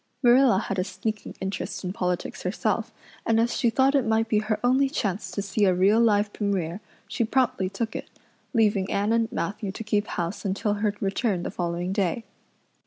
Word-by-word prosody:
Marilla 245 -3 +6
had 195 -1 -2
a - - +2
sneaking 200 +3 -5
interest 190 -1 -4
in 180 0 -3
politics 180 -2 -2
herself, 215 +4 -1 0.3
and 225 0 +2
as 235 +1 +1
she 240 - +2
thought 265 +4 +3
it 275 -3 +3
might 225 0 +1
be 215 -1 +2
her 215 0 -1
only 260 +3 +3
chance 200 - -2
to 190 +2 -3
see 205 +1 0
a 185 -2 +3
real 195 +5 +4
live 210 -2 +3
Premier, 195 -3 -2 0.3
she - - -1
promptly 230 -5 +1
took 220 +3 -4
it, - - -5 0.4
leaving 210 -5 +2
Anne 205 +3 +1
and 230 0 +1
Matthew 205 -3 -3
to 215 - -7
keep 210 -1 0
house 175 +3 -3
until 200 +1 0
her 210 0 -1
return 195 -2 0
the - - -3
following 175 +1 -2
day. 200 +3 0
210 Hz, 190 wpm, -26 LUFS, 190-225 Hz, 0.4 s, Marilla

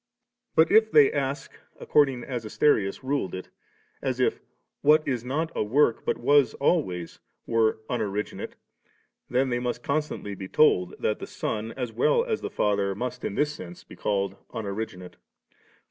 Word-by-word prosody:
But 160 +1 +5
if 220 +1 +5
they 145 -2 +6
ask 140 0 -2 0.3
according 135 -4 +2
as 125 -3 -4
Asterius 105 -2 +1
ruled 135 -8 -1
it, 95 - -8 0.5
as - - -2
if - - +1 0.4
'what 155 +1 +4
is 125 -4 -1
not 155 +6 -2
a - - 0
work 120 +2 +2
but - - 0
was 145 -2 +3
alwavs 95 - 0
' - - -52
were 115 -1 +2
unoriginate^ 105 -3 -3 0.8
then 130 +2 +1
they 120 -1 0
must 125 0 -3
constantly 150 -8 -2
be 95 -1 -7
told 90 -10 +3
that 105 - -1
tiie - - -6
Son 110 +1 -3
as 125 -3 -4
well 300 - +3
as 445 -3 -2
the - - -4
Father 100 -2 0
must 125 +3 -4
in 100 - -3
this 150 0 +1
sense 175 +3 -10
be - - -13
called 100 -1 -1
unoriginate. 100 -4 -5
125 Hz, 160 wpm, -26 LUFS, 105-145 Hz, 0.8 s, they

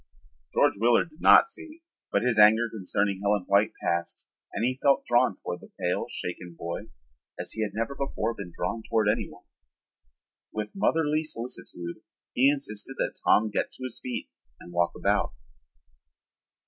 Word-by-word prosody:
George - - +3
Willard 120 +8 +3
did 155 - -18
not - - +8
see, 330 -3 -11 0.3
but - - +2
his 125 -3 +2
anger 110 +3 +7
concerning 100 -1 -1
Helen 100 -1 +1
White 100 +2 +3
passed 85 0 -2 0.2
and 115 - -1
he 130 +1 -1
felt 140 -1 +3
drawn 120 -4 +3
toward 90 -1 -6
the - - -14
pale, - - -1
shaken 90 -1 -5
boy 85 0 -5 0.5
as - - -2
he 110 - -3
had 105 -2 -1
never 115 +5 -1
before 125 -5 -2
been 95 -5 -8
drawn 95 +7 -3
toward 110 -1 +1
anyone. 110 +3 -2 1.1
With 105 -1 -4
motherly 160 -5 +2
solicitude, 115 - -5 0.4
he 130 +3 +5
insisted 135 -3 -3
that - - -2
Tom 110 0 +4
get - - -1
to - - -10
his 130 -2 -5
feet 125 - -5 0.3
and 85 - -12
walk 85 0 +1
about. - - +1
110 Hz, 160 wpm, -27 LUFS, 100-130 Hz, 1.1 s, not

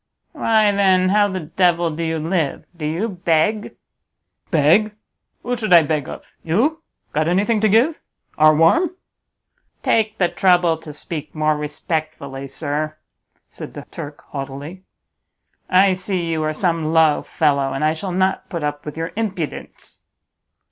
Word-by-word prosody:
"Why 215 -2 +2
then, 190 -2 +3
how 205 +1 +4
the 190 -2 -4
devil 170 +1 +1
do 160 +2 -4
you 160 0 -1
live? 160 -2 -1
Do 155 -3 -4
you 170 +9 -1
beg?" 185 +2 0 0.7
"Beg? 180 +7 +3 0.5
Who 245 0 -1
should 215 -5 0
I 170 -2 +8
beg 150 -2 -2
of? - - -10
You? 260 - +1 0.3
Got 155 +1 +1
anything 205 +6 +2
to 215 0 +3
give? 245 +10 +3 0.4
Are 155 0 +5
warm?" 335 - +3 0.9
"Take 220 -1 +1
the 180 - +3
trouble 175 -3 +3
to 160 -1 -10
speak 150 +1 -7
more 155 0 +1
respectfully, 150 -2 -4
sir!" 155 +2 -3 0.5
said - - -9
the - - -8
Turk, 145 0 -8
haughtily; 140 +6 -7 0.9
"I 190 +1 +5
see 185 -1 -2
you 160 -1 -1
are 155 - 0
some 165 -1 -1
low 160 -2 +4
fellow, 140 -2 0
and 135 - -3
I 155 +1 +3
shall 185 +4 -5
not 190 +1 0
put 170 -5 -4
up 145 0 -4
with 150 - -6
your 165 +1 -3
impudence." 195 -8 -5
165 Hz, 150 wpm, -20 LUFS, 155-195 Hz, 0.9 s, I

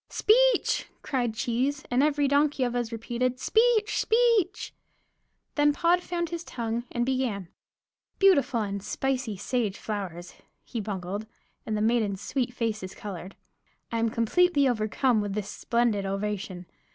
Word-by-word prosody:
"Speech!" - - +3 0.2
cried 240 -5 -1
Cheese, 260 +6 -1
and 245 +2 +3
every 290 -1 +2
donkey 285 -1 +2
of 245 -1 0
us 240 -1 -1
repeated, 240 +2 -2
"Speech, 445 - +3
Speech!" 450 -4 +2 0.8
Then 295 0 +3
Pod 345 +4 +3
found 345 -1 -3
his 340 0 -4
tongue 235 -4 -3
and 240 0 0
began: 245 -9 -1 0.7
"Beautiful 290 -11 +4
and 200 -1 -4
spicy 255 -2 -2
sage 215 -1 -1
flowers," 180 -5 -5 0.3
he 235 - -4
bungled; 200 +1 -4 0.4
and 215 -1 -1
the - - -1
maidens' 220 -4 +1
sweet 245 +4 -2
faces 215 -6 -3
colored, 190 -2 -7 0.6
"I 230 - -1
am 230 0 +2
completely 285 +6 +3
overcome 230 0 +1
with 205 -1 -3
this 210 -1 -3
splendid 235 -4 0
ovation. 195 -2 -3
240 Hz, 140 wpm, -27 LUFS, 210-285 Hz, 0.8 s, Beautiful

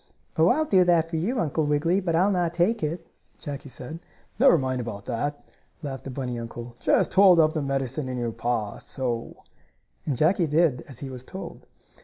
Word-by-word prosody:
"Oh, 160 +1 +4
I'll 305 +11 +3
do 190 -10 +5
that 165 -2 +3
for 165 - -1
you, 225 +11 -1
Uncle 155 -1 0
Wiggily, 160 +6 +2
but 175 -4 -1
I'll 190 +5 +3
not 175 -3 0
take 200 +6 +2
it," 165 +3 -3 0.3
Jackie 145 -1 -7
said. 130 +6 -8 0.4
"Never 255 -9 +7
mind 130 -3 -1
about 110 -4 -6
that," 145 +5 -3 0.4
laughed 135 -3 -5
the - - -5
bunny 125 -2 -4
uncle. 120 +1 -8
"Just - - +2
hold 190 -2 +7 0.2
the 155 - -1
medicine 135 0 -2
in 125 - -3
your 120 -1 -2
paw, 115 -3 -2
so," 120 -3 -4 0.7
and 140 -5 0
Jackie 165 +3 +3
did 150 -3 +2
as 135 - -11
he 135 +1 -7
was 125 -1 -7
told. 190 +8 -9
145 Hz, 190 wpm, -26 LUFS, 125-170 Hz, 0.7 s, Never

